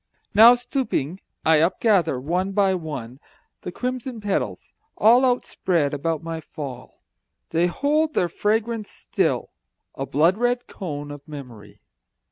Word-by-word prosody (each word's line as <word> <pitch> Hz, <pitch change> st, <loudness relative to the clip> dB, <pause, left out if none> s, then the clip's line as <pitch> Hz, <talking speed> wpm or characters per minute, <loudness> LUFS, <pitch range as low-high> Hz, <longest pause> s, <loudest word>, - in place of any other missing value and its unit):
Now, 225 Hz, +4 st, +9 dB
stooping, 245 Hz, -, -2 dB, 0.3 s
I 160 Hz, 0 st, +5 dB
upgather, 170 Hz, -, +2 dB
one 180 Hz, +8 st, -1 dB
by 195 Hz, -1 st, +3 dB
one, 140 Hz, -8 st, -6 dB, 0.4 s
The 180 Hz, -, -6 dB
crimson 250 Hz, +2 st, -4 dB
petals, 205 Hz, -2 st, -3 dB, 0.2 s
all 240 Hz, +4 st, +6 dB
Outspread 180 Hz, -, 0 dB
about 155 Hz, +2 st, -2 dB
my 165 Hz, -1 st, -5 dB
fall. 135 Hz, -5 st, -9 dB, 0.5 s
They 170 Hz, +2 st, +2 dB
hold 300 Hz, -, 0 dB
their 175 Hz, -, +2 dB
fragrance 220 Hz, +4 st, -1 dB
still, -, -, -1 dB, 0.4 s
a 135 Hz, -, -5 dB
blood 165 Hz, -, +2 dB
red 245 Hz, 0 st, +1 dB
cone 145 Hz, -6 st, -6 dB
Of 145 Hz, +1 st, -10 dB
memory. 125 Hz, -9 st, -11 dB
175 Hz, 125 wpm, -23 LUFS, 145-225 Hz, 0.5 s, Now